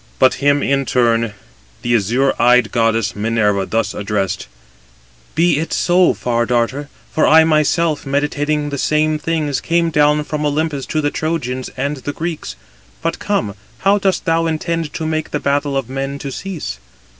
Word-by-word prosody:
But 130 -1 +5
him 145 0 +3
in 140 -1 +1
turn 115 -3 +1 0.5
the 120 - +1
azure 120 +6 +2
eyed 125 -1 +4
goddess 115 -2 +1
Minerva 105 -2 +1
thus 110 -1 -1
addressed: 100 -2 -2 0.9
"Be 165 -2 +3
it 165 - -3
so, 180 +1 +3
Far 120 -1 0
darter; 125 +4 0 0.2
for 155 - +2
I 160 +1 +7
myself, 155 0 +2
meditating 145 +1 -1
the 140 - -3
same 155 +1 +1
things, 150 -4 -1
came 170 0 +1
down 150 0 +3
from 150 0 -3
Olympus 150 -1 -1
to 155 - -1
the 145 -1 0
Trojans 130 -6 -2
and 140 +3 -2
the 145 +2 -5
Greeks. 165 0 -4 0.5
But 165 - -1
come, 160 - -1 0.3
how 200 +1 +3
dost 190 -2 0
thou 165 -1 +2
intend 165 0 -2
to 160 - -4
make 155 0 -2
the - - -2
battle 140 0 0
of 135 -4 -2
men 135 +1 -4
to 140 -1 -6
cease?" 160 - -5
145 Hz, 165 wpm, -18 LUFS, 120-155 Hz, 0.9 s, I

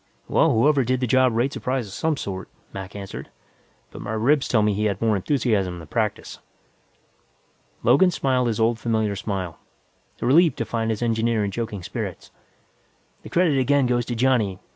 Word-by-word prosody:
"Well, - - +3
whoever 135 +4 +3
did 130 +1 0
the 125 - 0
job 130 0 +3
rates 130 +4 0
a - - -6
prize 130 -2 -1
of 100 - -11
some 160 +6 -1
sort," 95 -5 -5 0.2
Mac 95 0 -7
answered, 100 -2 -7 0.6
"but - - -9
my 105 - -4
ribs 135 +6 +2
tell 110 -3 +2
me 105 0 +2
he 105 +2 -1
had 100 -2 -1
more 110 -2 +2
enthusiasm 100 -5 0
than 80 -2 -10
practice." - - -2 1.4
Logan 140 +11 +5
smiled 130 -7 0
his 115 -2 -1
old 115 0 +2
familiar 110 -3 0
smile, 95 -4 -4 0.6
relieved 160 +6 +4
to 115 - -2
find 115 0 -2
his 110 +1 -2
engineer 115 -2 +1
in 100 - -3
joking 105 -3 -4
spirits. - - -6 0.9
"The - - -11
credit 170 -6 +2
again 140 +1 +3
goes 120 -1 0
to 120 - -2
Johnny. 115 -6 +1
115 Hz, 180 wpm, -23 LUFS, 105-130 Hz, 1.4 s, Logan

